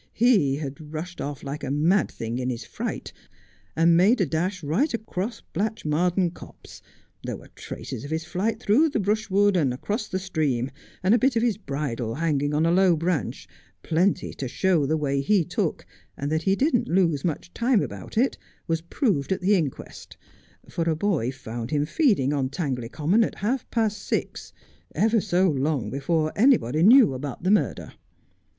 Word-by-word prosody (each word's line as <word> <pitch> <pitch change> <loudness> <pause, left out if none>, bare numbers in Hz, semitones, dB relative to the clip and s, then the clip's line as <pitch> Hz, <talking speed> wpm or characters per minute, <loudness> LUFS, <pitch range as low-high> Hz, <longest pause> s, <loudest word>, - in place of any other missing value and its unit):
He'd 150 - +2
rushed 155 +3 -7
off 145 -1 -5
like 140 +1 -5
a 130 - -3
mad 160 +8 +2
thing 115 +2 -5
in 130 0 -2
his 115 -2 -4
fright, - - -5 0.6
and 165 +1 +4
made 205 +8 +4
a 190 - +3
dash 170 +4 -2
right 180 - +1
across 220 0 -4
Blatch 215 +4 -2
mardean 175 +3 +1
Copse; - - -13 0.4
there - - -4
were - - -15
the - - -17
traces 110 - -8
of 145 - -7
his 160 +1 -2
flight 205 +6 -2
through 250 +9 +3
the 280 - -1
brushwood 205 -1 +2
and 145 -8 +2
across 210 - -3
the 185 - -2
stream, 150 -9 -1 0.3
and 190 +4 +4
a 235 - +4
bit 260 +2 +2
of 230 - +2
his 230 -3 +1
bridle 135 - -3
hanging 145 -3 0
on 150 +2 +1
a 165 - +3
low 185 -1 +4
branch, 165 -1 -2 0.4
plenty 180 +3 +1
to 135 - -5
show 165 +1 +1
the 160 +2 +1
way 140 -2 0
he 180 +4 +2
took, - - -2 0.3
and 145 +1 -3
that 160 0 +1
he 190 +4 +2
didn't 265 0 +1
lose 165 -6 +2
much 175 +1 -3
time 235 -3 +2
about - - -8
it 255 +4 +2 0.3
was 165 -1 -1
proved 170 - -1
at 190 - 0
the 195 +3 +3
inquest, 160 -9 -3 0.5
for 165 - -2
a 160 - +1
boy 155 - 0
found 120 -3 -7
him 145 0 +1
feeding 180 - +2
on 135 -3 0
Tangley 130 -6 -3
Common 175 - +2
at - - -3
half 240 +6 -2
past 220 -3 0
six, - - -3 0.4
ever 220 0 +3
so 185 -1 +2
long 145 - -1
before 155 +3 0
anybody 155 - +3
knew 230 - +7
about 135 +2 -6
the 185 - +2
murder. 210 - 0
165 Hz, 185 wpm, -25 LUFS, 145-205 Hz, 0.6 s, knew